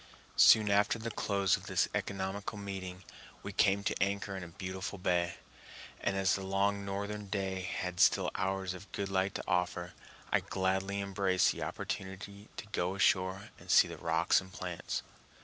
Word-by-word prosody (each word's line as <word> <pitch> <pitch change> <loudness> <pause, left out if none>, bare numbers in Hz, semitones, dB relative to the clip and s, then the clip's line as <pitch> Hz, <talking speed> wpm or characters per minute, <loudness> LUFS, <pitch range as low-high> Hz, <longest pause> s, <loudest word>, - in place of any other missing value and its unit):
Soon 105 -2 +7
after 100 +3 +3
the 115 +1 -4
close 100 -3 +2
of 95 0 -9
this 95 -2 +2
economical 100 0 -3
meeting, 95 -2 -6 0.4
we - - -5
came 100 +1 +3
to - - 0
anchor 100 0 0
in 95 - -5
a - - -7
beautiful 95 +3 -5
bay, 85 -2 +1 0.6
and 100 - 0
as 95 0 +3
the 95 - -1
long 100 +1 +1
northern 100 +1 -4
day 95 -1 -2
had 90 -1 -4
still - - +4
hours 95 -1 -1
of 95 +2 -11
good 100 -1 -2
light 95 0 0
to - - -3
offer, 90 -1 0 0.4
I - - +4
gladly 95 +1 -1
embraced 95 -1 +2
the - - -6
opportunity 100 +2 -5
to 120 - -5
go 90 0 0
ashore 95 0 +2
to - - -15
see - - +7
the - - -7
rocks 80 +2 +3
and 95 0 -13
plants. 90 -2 -4
95 Hz, 170 wpm, -33 LUFS, 95-100 Hz, 0.6 s, Soon